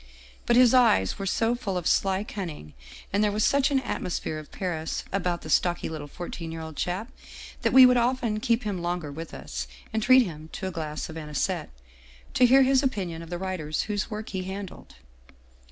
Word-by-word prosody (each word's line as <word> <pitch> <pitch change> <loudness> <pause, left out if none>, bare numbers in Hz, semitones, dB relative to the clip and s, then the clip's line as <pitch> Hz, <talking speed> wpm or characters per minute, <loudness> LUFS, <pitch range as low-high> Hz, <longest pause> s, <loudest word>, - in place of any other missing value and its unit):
" - - -24
But 240 - +4
his 250 -1 +6
eyes 230 - +4
were 195 - -3
so 225 +5 +1
full 200 -6 -3
of 175 - -4
sly 195 +3 +2
cunning, 165 - -7 0.4
and 200 +2 +3
there 210 - +2
was 210 +1 0
such 280 0 +3
an 275 -2 +2
atmosphere 170 -8 -3
of 155 - -12
Paris 165 -4 -3
about 180 -3 -1
the 155 - -8
stocky 175 +2 +2
little 155 -2 -6
fourteen 165 +1 -7
year 165 0 -6
old 160 -1 -8
chap, 190 - -3 0.5
that - - +1
we 265 -1 +9
would 250 0 +5
often 240 -3 +1
keep 235 0 +1
him 200 -4 -3
longer 175 -3 -3
with 160 +3 -7
us, 65 -1 -6 0.3
and 220 - 0
treat 255 +3 +6
him 160 -5 -8
to - - -5
a 190 - -2
glass 155 -3 -4
of 160 - -8
anisette 150 -2 -2 0.6
to 250 - +5
hear 265 +2 +7
his 265 0 +4
opinion 185 - -2
of 165 - -10
the 175 - -3
writers 175 -5 -2
whose 210 0 -2
work 215 -1 -5
he 190 - -3
handled. 195 0 -8
190 Hz, 205 wpm, -26 LUFS, 160-230 Hz, 0.6 s, we